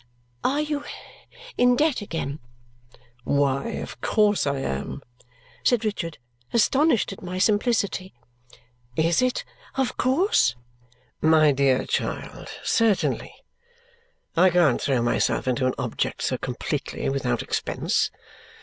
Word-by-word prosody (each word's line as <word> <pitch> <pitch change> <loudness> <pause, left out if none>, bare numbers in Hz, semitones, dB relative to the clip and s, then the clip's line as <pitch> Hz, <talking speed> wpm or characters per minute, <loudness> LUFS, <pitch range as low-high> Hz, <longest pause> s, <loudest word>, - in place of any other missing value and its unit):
"Are 285 +3 +2
you 295 -1 -2 0.8
in 245 0 +5
debt 295 -2 +2
again?" 160 -7 -4 0.8
"Why, 140 +1 +1
of - - -6
course 210 -6 +2
I 140 0 0
am," 70 - -4 0.6
said 240 -2 +2
Richard, 170 -6 -3 0.3
astonished 245 -1 +3
at - - -12
my 180 0 -5
simplicity. 200 -2 +1 0.8
"Is 165 - +2
it 255 0 0 0.3
of 265 -2 -1
course?" 265 - +3 0.7
"My 155 -1 +5
dear 135 -2 +2
child, - - -3
certainly. 225 -4 +1 1.0
I 185 +2 +6
can't 175 -3 +3
throw 130 -4 +1
myself 120 - +1
into 130 +1 +1
an 130 - -1
object 125 -3 -2
so - - 0
completely - - -3
without 130 -3 -1
expense. - - 0
180 Hz, 115 wpm, -24 LUFS, -, 1.0 s, I